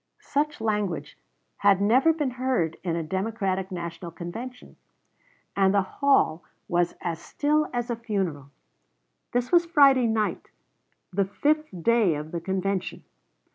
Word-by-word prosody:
Such 295 +1 -1
language 210 -5 -2 0.4
had 200 -1 +4
never 250 +10 +4
been 295 -5 -1
heard 250 -10 0
in 170 -3 -1
a 165 - -2
Democratic 190 +1 -2
National 170 -1 -5
Convention, 225 +10 -8 0.8
and 195 0 +3
the 200 - +4
hall 190 - +2 0.2
was 175 0 +1
as 165 -2 -3
still 300 +1 0
as 240 0 -2
a - - 0
funeral. 190 - -3 0.8
This 245 0 -1
was 345 -1 +4
Friday 275 -6 +5
night, 220 -1 -1 0.6
the 195 +1 +2
fifth 305 +10 0
day 225 -7 +3
of 150 +1 -6
the 170 - -3
convention. 190 +1 -2
205 Hz, 135 wpm, -26 LUFS, 175-255 Hz, 0.8 s, Friday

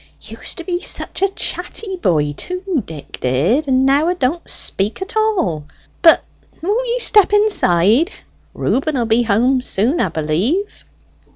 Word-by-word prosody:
Used - - -5
to 340 - -5
be 350 0 -3
such - - -2
a 390 - +3
chatty 390 +1 -3
boy, 155 - 0
too, 365 - -3
Dick 155 -3 -9
did; 165 - +1
and 260 0 +2
now 280 +4 +3
'a 360 - 0
don't 335 +2 -2
speak 200 +3 -3
at 385 +4 -7
all. 365 - 0 0.4
But 330 - +6 0.4
won't 425 +9 -1
ye 475 +1 0
step 420 -5 +4
inside? 310 - +3 0.5
Reuben 295 +3 -1
will 240 - 0
be 225 +1 +2
home 240 +4 +2
soon, 250 - 0
'a - - +1
b'lieve." 190 - -2
275 Hz, 155 wpm, -18 LUFS, -, 0.5 s, But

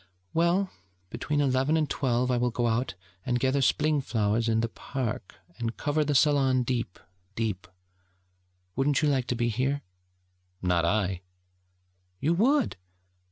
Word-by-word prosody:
'Well, 175 +4 +2 0.4
between 145 +5 -1
eleven 135 +3 +2
and 155 -2 +1
twelve 125 -2 0
I 125 - +2
will 125 0 +1
go 120 +1 -1
out 120 +2 0 0.3
and 125 -1 0
gather 135 +2 +1
Spling 150 +2 +2
flowers 115 -2 0
in 115 0 +2
the 115 - 0
park, 115 -4 -5 0.2
and 115 -1 -3
cover 150 +1 +1
the 145 -1 0
salon 135 -3 +4
deep, 120 -6 -2 0.4
deep. 105 -5 -2 1.1
Wouldn't 140 +3 +2
you 150 - +4
like 130 -4 +1
to 125 - 0
be 120 0 0
here?' 130 +5 -1 0.8
'Not 90 -2 +1
I.' 95 -1 0 1.0
'You 160 +4 +2
would!' 255 - +2
130 Hz, 145 wpm, -28 LUFS, 115-145 Hz, 1.1 s, salon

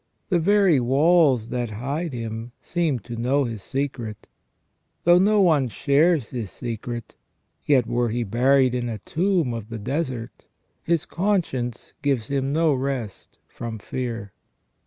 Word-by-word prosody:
The 180 -3 +3
very 195 -3 +4
walls 135 -2 +3
that 120 -1 -2
hide 140 +10 -3
him 115 -1 -5
seem 165 -6 0
to 120 - -7
know 130 +5 +1
his 115 -5 -4
secret. 130 -4 -4 0.8
Though 175 +1 +6
no 205 +2 +4
one 155 -8 +4
shares 140 - +2
his 115 -6 -4
secret, 120 0 -6 0.5
yet 135 -5 +4
were 120 0 0
he 120 +2 -1
buried 130 +4 +3
in 120 -1 -1
a 110 - -3
tomb 165 - 0
of 115 -2 -6
the 115 - -5
desert, 130 0 -4 0.3
his 170 -1 0
conscience 165 - -1
gives 135 -6 0
him 135 -1 0
no 160 0 +3
rest 130 -6 -4
from 115 -1 -6
fear." 115 -3 -5
130 Hz, 140 wpm, -24 LUFS, 115-155 Hz, 0.8 s, Though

